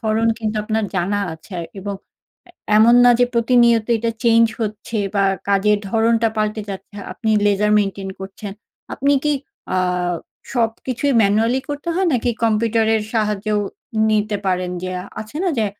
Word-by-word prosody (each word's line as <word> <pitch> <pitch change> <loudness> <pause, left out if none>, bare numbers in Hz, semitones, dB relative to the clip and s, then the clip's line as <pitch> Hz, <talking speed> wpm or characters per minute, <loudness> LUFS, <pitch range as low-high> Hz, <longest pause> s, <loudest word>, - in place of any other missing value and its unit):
ধরন 225 0 +1
কিন্তু 215 -1 -3
আপনার 220 0 -1
জানা 195 +3 0
আছে, 160 +5 -14
আরকি, 165 - -9
এবং 200 0 -4 0.5
এ - - -16 0.3
এমন 225 +3 +6
না 245 - +7
যে, 245 - +7
প্রতিনিয়ত 235 -1 +4
এটা 230 +1 -1
চেঞ্জ 230 0 +5
হচ্ছে 215 +1 -3 0.2
বা 200 -1 +3 0.2
কাজের 205 +1 +3
ধরনটা 225 +1 +2
পাল্টে 215 0 -1
যাচ্ছে। 195 +2 -9 0.2
আপনি 220 +3 -2 0.2
লেজার 205 +1 +2
মেইনটেইন 195 -1 -2
করছেন। 195 +1 -7 0.4
আপনি 280 +1 +1
কি, 295 - +2 0.4
আ - - +2 0.7
সবকিছুই 250 +3 -1
ম্যানুয়ালি 225 +6 +2
করতে 290 +3 -5
হয়, 375 +1 +1
নাকি 245 0 +1
কম্পিউটারের 225 0 +2
সাহায্যেও 210 -1 0 0.5
নিতে 210 -1 +1
পারেন? 180 -1 0
যে 185 - -3 0.3
আছে 220 +7 -9
না? 370 - +2
যে, 215 - +2
220 Hz, 150 wpm, -20 LUFS, 205-230 Hz, 0.7 s, না